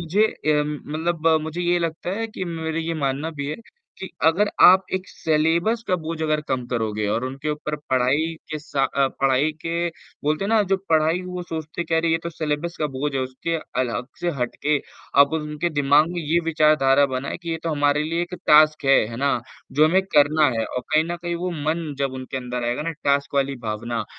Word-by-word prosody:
मुझे 185 +7 +2
अ, 150 -7 0
मतलब 160 +2 -2
मुझे 160 +3 -4
ये 175 0 +2
लगता 165 +1 -3
है 225 - -1
कि 215 -4 -6
मेरी 160 -1 -3
ये 165 - -1
मानना 140 +4 -1
भी 145 -3 -5
है 155 - -4 0.4
कि 190 - -6 0.2
अगर 190 +6 +4
आप 190 +1 +8
एक 185 0 -3
सिलेबस 165 +8 +1
का 185 - +2
बोझ 160 0 -4
अगर 155 -1 +1
कम 130 -2 -1
करोगे 110 -3 -2
और 115 +4 0
उनके 135 +4 -4
ऊपर 150 0 -3
पढ़ाई 135 +6 +2 0.2
के 155 - -3
सा 145 -2 -2
अ, 140 -1 +1
पढ़ाई 135 +3 +3
के 170 +1 -1 0.4
बोलते 155 +5 0
हैं - - -2
ना 220 -1 +4
जो - - +5
पढ़ाई 160 +3 +3
वो 180 0 -5
सोचते 160 0 -5
कह 165 -1 +1
रही 165 0 +1
है 165 - +2
तो 170 - -3
सिलेबस 160 +1 -3
का 155 - +2
बोझ 145 +1 -3
है, 135 - 0
उसके 130 +6 -3 0.2
अलग 120 -1 -2
से 175 0 0
हट 120 -1 -1
के 150 -1 +3 0.4
आप 140 +1 +5
उनके 150 +2 -2
दिमाग 145 +1 +4
में 175 - -3
ये 160 +3 +2
विचारधारा 150 -4 +4
बनाए 130 +1 -3
कि 170 - -4
ये 165 - -1
तो 165 - -1
हमारे 145 0 +2
लिए 165 +2 -1
एक 175 +1 -5
टास्क 150 0 +6
है, 135 0 +6
है 115 - -7
ना? 140 -1 +1 0.3
जो 150 +2 +5
हमें 190 +4 +3
करना 150 -3 +4
है 115 - +1
और 125 - -4
कहीं 155 +1 +4
न 170 +1 -3
कहीं 175 0 -2
वो 180 +2 -3
मन 160 +1 -2
जब 135 -1 -1
उनके 130 +1 -6
अंदर 125 -1 -4
आएगा 120 +4 -1
ना 165 - -2
टास्क 140 0 +1
वाली 140 -1 +1
भावना 110 +1 -3
155 Hz, 215 wpm, -23 LUFS, 140-165 Hz, 0.4 s, आप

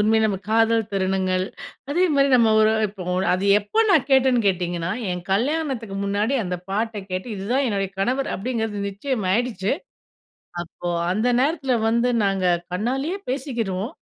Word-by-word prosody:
உண்மையிலே 220 +1 +3
நம்ம 200 -3 -1
காதல் 225 -1 +3
தருணங்கள், 185 -1 0 0.5
அதேமாரி 295 -4 +3
நம்ம 225 -2 +4
ஒரு 215 0 +4 0.2
இப்போ 195 -2 -9 0.3
அது 185 - -2
எப்போ 210 - -4
நான் 295 -7 +4
கேட்டேன்னு 260 -2 +4
கேட்டீங்கன்னா, 175 -2 -1 0.2
என் 180 0 -3
கல்யாணத்துக்கு 250 -2 -1
முன்னாடி 205 +6 0
அந்த 180 -1 -2
பாட்ட 220 +3 -1 0.2
கேட்டு 185 +6 -3
இதுதான் 245 +8 0
என்னுடைய 195 -2 -1
கணவர் 255 +7 0
அப்பிடிங்கிறது 220 -1 -3
நிச்சயமாயிடுச்சு. 215 -1 -1 0.9
அப்போ 175 +1 -7 0.2
அந்த 220 +5 +1
நேரத்தில 280 -2 0 0.2
வந்து 235 +2 +2 0.2
நாங்க 195 -1 0 0.3
கண்ணாலேயே 270 - -1
பேசிக்கிருவோம். 235 - -3
220 Hz, 130 wpm, -23 LUFS, 195-255 Hz, 0.9 s, நம்ம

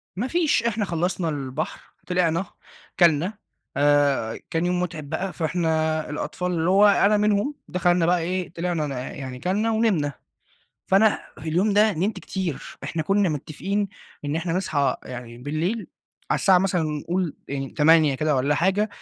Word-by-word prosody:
ما 235 +7 -2
فيش 315 -6 +2
إحنا 220 -3 0
خلصنا 175 0 -1
البحر، 140 0 -5
طلعنا، 180 0 +1 0.5
اكلنا، 175 +4 +3 0.4
آآ، 145 -5 +2
كان 165 0 0
يوم 180 0 +1
متعب 160 -5 -4
بقى، 190 0 -3
فإحنا 160 -2 0
الأطفال- 180 +4 -3
اللي 165 0 0
هو 200 +2 +6
أنا 205 +1 +4
منهم 210 +7 +1
دخلنا 175 -1 +2
بقى 175 +1 +3
إيه، 180 0 -3
طلعنا 170 -3 -1
ن - - -5
يعني 130 0 -6
اكلنا 205 - 0
ونمنا. 195 -11 +1 0.7
فأنا 205 +3 +4 0.2
في 160 - -6
اليوم 185 +6 +2
ده 210 +1 +4
نمت 190 +7 -1
كتير، 185 -7 -5
إحنا 160 - -2
كنا 195 +3 +2
متفقين 190 +7 -2 0.4
إن 145 +2 -1
إحنا 165 +1 -2
نصحى 155 -6 0
يعني 120 -1 -8
بالليل، 160 - -2 0.4
على - - +2
الساعة 190 -2 +5
مثلًا 180 -2 +1
نقول 160 +3 -2
يعني 135 -1 -4
20:00 155 -1 +4
كده 150 +1 +1
والَّا 140 +3 +2
حاجة 195 +5 +2
170 Hz, 155 wpm, -24 LUFS, 150-195 Hz, 0.7 s, هو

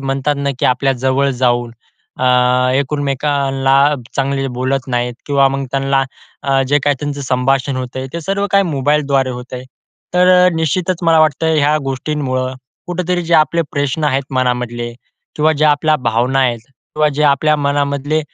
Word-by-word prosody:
म्हणतात 135 +2 -1
ना 140 0 -1
की - - +1
आपल्या 135 +2 +1
जवळ 130 +2 0
जाऊन 120 -1 +1 0.5
अ, 130 - 0 0.5
एकमेकांना 140 -1 0 0.4
चांगले 135 0 0
बोलत 130 +1 -1
नाहीत 120 -1 -1
किंवा 140 -1 +3
मग 135 0 -3
त्यांना 135 0 +1 0.4
अ, 135 -1 +1
जे 145 +1 +3
काही 145 -1 +2
त्यांचं 145 -1 -4
संभाषण 130 +1 0
होतंय 130 +1 -5
ते 170 - -4
सर्व 195 +4 -1
काही 200 0 +5
मोबाईलद्वारे 140 -3 0
होत 125 +1 -8
आहे. 125 0 -7 0.5
तर 180 0 +5
निश्चितच 165 +3 0
मला 165 -1 +4
वाटतं 155 +1 +2
ह्या 150 +1 +3
गोष्टींमुळं 130 -1 -2 0.3
कुठेतरी 180 0 -2
जे 170 0 0
आपले 165 +2 +3
प्रश्न 145 +2 -1
आहेत 140 -1 +1
मनामधले 125 -2 -1 0.4
किंवा 155 +1 +3
ज्या 155 0 +3
आपल्या 155 +1 +2
भावना 120 +3 +1
आहेत 120 -3 +1
किंवा 150 +3 -2
जे 150 - 0
आपल्या 150 +2 +3
मनामधले 145 +1 0
140 Hz, 155 wpm, -16 LUFS, 130-150 Hz, 0.5 s, काही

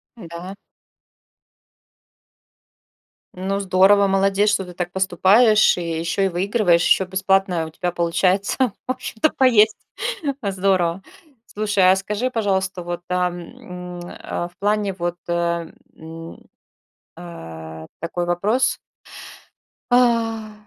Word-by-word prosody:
Н-да. 175 -2 -9 2.8
Ну, 190 +2 -2
здорово, 195 +1 +4
молодец, 195 +1 +2
что 195 -2 0
ты 180 - -11
так 175 0 -4
поступаешь, 195 +5 +4
и 165 -2 -3
ещё 170 +4 -1
и - - +3
выигрываешь, 185 -1 +2
ещё 190 - +3
бесплатно 190 -2 +1
у - - -8
тебя 175 +2 -3
получается, 180 +3 0 0.3
в - - 0
общем-то, 255 +1 -1
поесть. 225 -5 +4 0.6
Э, 200 - -2
здорово. 185 -2 +1 0.4
Слушай, 205 -4 +2
а - - +4
скажи, 210 +6 -2
пожалуйста, 190 -6 -1
вот, 175 0 -5
а, 180 0 +1
м, 180 -1 -9
а, 175 0 -5
в 175 - -30
плане 205 -1 0
вот, 175 0 -3
э, 170 -1 -1 0.2
м, 165 +1 -10 0.8
а, 80 -2 -9
такой 175 +1 -3
вопрос. 210 +9 +1 1.1
А. 230 -3 +2
190 Hz, 115 wpm, -21 LUFS, 175-205 Hz, 2.8 s, здорово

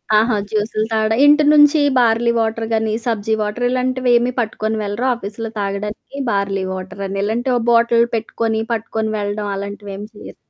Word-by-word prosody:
ఆహా! 220 +1 +3
జ్యూస్లు 215 0 -1
తాగడం. 220 0 +1
ఇంటి 295 +1 +6
నుంచి 295 +1 +6 0.2
బార్లీ 235 -1 +3
వాటర్ 225 0 -1
గానీ, 220 -1 0
సబ్జి 220 -2 -1
వాటర్ 210 +4 -2
ఇలాంటివి 255 0 0
ఏమి 245 +1 0
పట్టుకొని 220 -1 -2
వెళ్లరా 210 +5 -2
ఆఫీస్‌లో 220 +1 -6
తాగడానికి 210 +6 -5
బార్లీ 200 -1 -1
వాటర్ 190 +1 -7
అని. 195 +1 -4
ఇలాంటి 235 +5 -1
ఒ - - 0
బాటిల్ 235 0 +4
పెట్టుకొని, 225 0 -2
పట్టుకొని 220 0 -2
వెళ్లడం, 205 0 -3
అలాంటివేమి 200 +1 -7
చేయరు? 210 - -11
220 Hz, 155 wpm, -18 LUFS, 205-235 Hz, 0.2 s, ఇంటి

